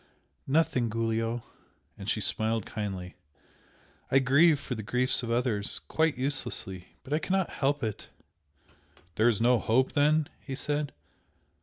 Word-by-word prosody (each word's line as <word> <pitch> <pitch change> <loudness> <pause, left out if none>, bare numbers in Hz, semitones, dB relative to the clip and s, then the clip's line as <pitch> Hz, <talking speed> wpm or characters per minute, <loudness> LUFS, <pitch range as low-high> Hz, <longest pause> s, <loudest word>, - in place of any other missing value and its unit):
"Nothing, 135 -5 +2
Giulio!" 115 +1 -1 0.5
and 100 +1 -6
she 110 - 0
smiled 110 +2 0
kindly 95 -4 -5 0.9
"I 135 - +4
grieve 145 +4 +5
for 135 - -5
the 110 - -4
griefs 125 +5 +1
of 120 - -5
others 115 -4 +1
quite 160 -3 0
uselessly! 115 -8 -2
but 140 - -5
I 155 - +2
cannot 190 +2 0
help 145 0 0
it!" 110 -2 -4 1.0
"There 110 +6 +3
is 110 - 0
no 120 +1 +4
hope, 130 +5 +2
then?" 150 +1 +3
he 135 - -6
said. 145 +1 -2
125 Hz, 140 wpm, -29 LUFS, 110-145 Hz, 1.0 s, grieve